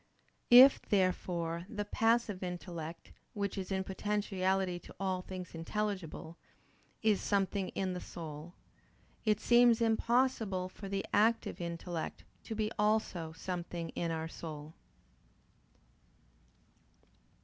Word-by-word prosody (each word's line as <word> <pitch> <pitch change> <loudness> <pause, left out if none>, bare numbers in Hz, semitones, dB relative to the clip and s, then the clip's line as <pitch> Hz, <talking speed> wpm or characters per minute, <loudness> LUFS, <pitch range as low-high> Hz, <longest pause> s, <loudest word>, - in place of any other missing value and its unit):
If, 255 +3 +9
therefore, 175 -3 0
the 210 -2 -3
passive 225 -2 +1
intellect, 175 -2 -6 0.2
which 200 -1 -2
is 190 -1 -5
in 190 0 0
potentiality 190 -2 0
to - - -14
all 190 -2 -1
things 180 -1 -7
intelligible, 170 -2 -3 0.7
is 215 -3 +3
something 195 -1 0
in 190 -1 -1
the 180 - -5
soul, 160 0 -8 0.7
it 215 -1 +3
seems 240 0 +5
impossible 225 -4 +1
for 195 +1 -9
the 195 0 -2
active 225 -2 +2
intellect 170 -1 -4 0.2
to 225 - -4
be 215 0 -1
also 210 -6 +1
something 175 -1 -4
in 170 - -2
our 160 0 -2
soul. 155 -2 -8
190 Hz, 110 wpm, -33 LUFS, 170-210 Hz, 0.7 s, If